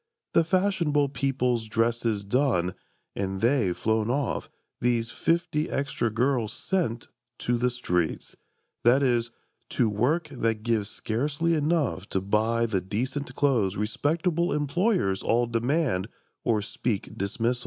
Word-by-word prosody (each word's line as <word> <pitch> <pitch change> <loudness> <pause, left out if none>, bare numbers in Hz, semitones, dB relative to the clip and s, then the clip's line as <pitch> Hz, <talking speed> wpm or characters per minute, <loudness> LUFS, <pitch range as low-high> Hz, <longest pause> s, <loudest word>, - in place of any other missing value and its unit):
The 165 - +5
fashionable 170 -6 +2
people's 125 -3 0
dresses 115 -1 0
done, 100 -6 +1 0.4
And 95 -1 -2
they 115 -4 +2
flown 110 +4 0
off, 135 +1 -1 0.3
these 120 -1 +1
fifty 165 -2 0
extra 140 -4 -1
girls 120 0 +1
Sent—to 120 - -3
the 125 +1 +2
streets: 90 -9 -2 0.5
that 130 +4 +5
is, 120 -3 +2 0.4
to 115 - +2
work 135 +11 +1
that 115 -5 -1
gives 110 -3 0
Scarcely 145 +11 -1
enough 150 - 0
to 95 - 0
buy 110 +4 +1
the 100 -5 0
decent 125 - -3
clothes 120 -10 +2
Respectable 160 - 0
employers 150 - +1
all 120 +1 +2
demand 120 - 0 0.4
Or 110 -3 +1
speak 110 -1 -3
dismissal. 115 +5 -1
120 Hz, 120 wpm, -27 LUFS, 110-145 Hz, 0.5 s, The